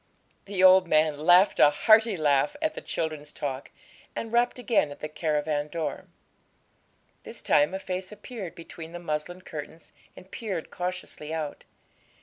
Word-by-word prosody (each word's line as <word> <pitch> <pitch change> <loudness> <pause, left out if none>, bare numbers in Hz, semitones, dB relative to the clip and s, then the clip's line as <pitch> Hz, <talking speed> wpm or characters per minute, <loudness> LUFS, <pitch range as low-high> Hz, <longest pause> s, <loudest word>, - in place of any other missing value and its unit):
The 195 -2 -1
old 185 -1 +7
man 155 -1 +2
laughed 180 +3 +6
a - - +8
hearty 215 +6 +4
laugh 150 - +2
at 315 0 0
the - - -7
children's 155 -2 -4
talk, 135 -1 -5 0.5
and 225 0 -5
rapped 240 +1 +2
again 235 -10 +1
at 145 - -10
the 155 - -4
caravan 150 -1 -1
door. 160 0 -4 1.1
This - - -8
time 150 +6 +3
a - - -3
face 185 0 -5
appeared 210 -3 -8
between 165 0 -10
the 175 - -6
muslin 170 +2 -4
curtains 160 0 -9 0.2
and 190 - -14
peered 190 -4 -5
cautiously 180 -4 -5
out. 155 -2 -4
170 Hz, 150 wpm, -27 LUFS, 150-190 Hz, 1.1 s, a